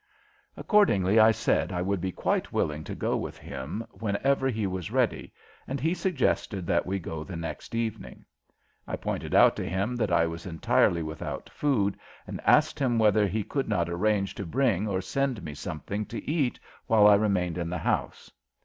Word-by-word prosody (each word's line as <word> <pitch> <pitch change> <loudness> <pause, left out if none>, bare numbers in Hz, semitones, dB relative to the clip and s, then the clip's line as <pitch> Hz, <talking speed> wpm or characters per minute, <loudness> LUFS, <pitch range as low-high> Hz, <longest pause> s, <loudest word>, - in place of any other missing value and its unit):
Accordingly 110 - +3
I 110 0 +8
said 85 -6 +1
I 90 -1 -1
would 95 -1 -1
be 95 0 -2
quite - - -1
willing 75 +1 -1
to - - -5
go - - -1
with - - -4
him 70 +12 -6
whenever 125 +7 0
he 110 -4 -1
was 95 -3 -3
ready, - - 0 0.4
and 135 +1 -3
he 160 +6 +1
suggested 130 - -1
that 85 +1 +1
we 95 +1 -1
go 80 -3 -5
the 95 +2 -8
next 85 +6 -6
evening. 115 -2 -4 0.6
I - - -2
pointed - - -3
out - - +6
to - - -3
him 100 +7 -1
that 110 -6 0
I 85 -1 +4
was 85 +2 -6
entirely 85 0 +2
without 80 0 -6
food 110 -9 0 0.3
and - - -6
asked - - +4
him 125 -4 +1
whether 105 -1 +4
he 105 +3 -1
could 135 +6 -3
not 85 -1 0
arrange 100 +2 0
to 100 - -6
bring 110 -2 +1
or 95 -2 -1
send 130 +1 -2
me 75 -2 -6
something 90 +6 -5
to 115 - -7
eat 145 -5 0 0.3
while 110 -2 +5
I 105 - +8
remained 95 -4 +1
in 85 -1 -2
the 90 - -2
house. - - -2
100 Hz, 185 wpm, -27 LUFS, 85-115 Hz, 0.6 s, I